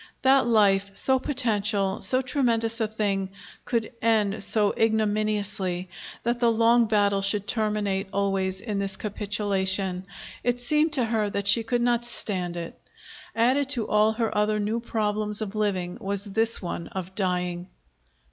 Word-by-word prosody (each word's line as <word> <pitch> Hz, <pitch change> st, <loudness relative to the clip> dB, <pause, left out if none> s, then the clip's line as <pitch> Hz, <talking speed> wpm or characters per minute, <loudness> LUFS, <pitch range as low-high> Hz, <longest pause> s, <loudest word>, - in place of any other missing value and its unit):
That 265 Hz, -1 st, +5 dB
life, 200 Hz, -3 st, +3 dB
so 265 Hz, -1 st, +2 dB
potential, 210 Hz, -8 st, 0 dB
so 255 Hz, +7 st, +1 dB
tremendous 235 Hz, -4 st, 0 dB
a 220 Hz, -, +2 dB
thing, 200 Hz, -3 st, -1 dB, 0.4 s
could 230 Hz, -2 st, -1 dB
end 215 Hz, -3 st, +1 dB
so 210 Hz, -1 st, +2 dB
ignominiously, 210 Hz, -4 st, 0 dB, 0.3 s
that 240 Hz, +1 st, 0 dB
the 235 Hz, -1 st, +4 dB
long 230 Hz, +1 st, +4 dB
battle 205 Hz, -2 st, +2 dB
should 200 Hz, +1 st, 0 dB
terminate 210 Hz, -3 st, -1 dB
always 195 Hz, -1 st, -1 dB
in 210 Hz, -4 st, -3 dB
this 195 Hz, -1 st, -3 dB
capitulation 195 Hz, -3 st, -2 dB, 0.4 s
it 245 Hz, 0 st, 0 dB
seemed 300 Hz, +6 st, +2 dB
to 260 Hz, -5 st, +2 dB
her 220 Hz, -2 st, 0 dB
that 200 Hz, 0 st, -3 dB
she 210 Hz, +3 st, +6 dB
could 240 Hz, +2 st, -1 dB
not 240 Hz, -1 st, +2 dB
stand 185 Hz, -7 st, -2 dB
it. 170 Hz, -1 st, -7 dB, 0.5 s
Added 255 Hz, +4 st, +2 dB
to 245 Hz, -6 st, 0 dB
all 215 Hz, +1 st, +3 dB
her 225 Hz, -1 st, -2 dB
other 210 Hz, 0 st, +1 dB
new 215 Hz, +3 st, -1 dB
problems 210 Hz, -2 st, -2 dB
of 215 Hz, -2 st, -4 dB
living 190 Hz, -5 st, -2 dB
was 200 Hz, 0 st, -3 dB
this 220 Hz, +3 st, 0 dB
one 170 Hz, -1 st, -4 dB
of 190 Hz, -1 st, -6 dB
dying. 180 Hz, -2 st, -2 dB
210 Hz, 150 wpm, -26 LUFS, 195-230 Hz, 0.5 s, she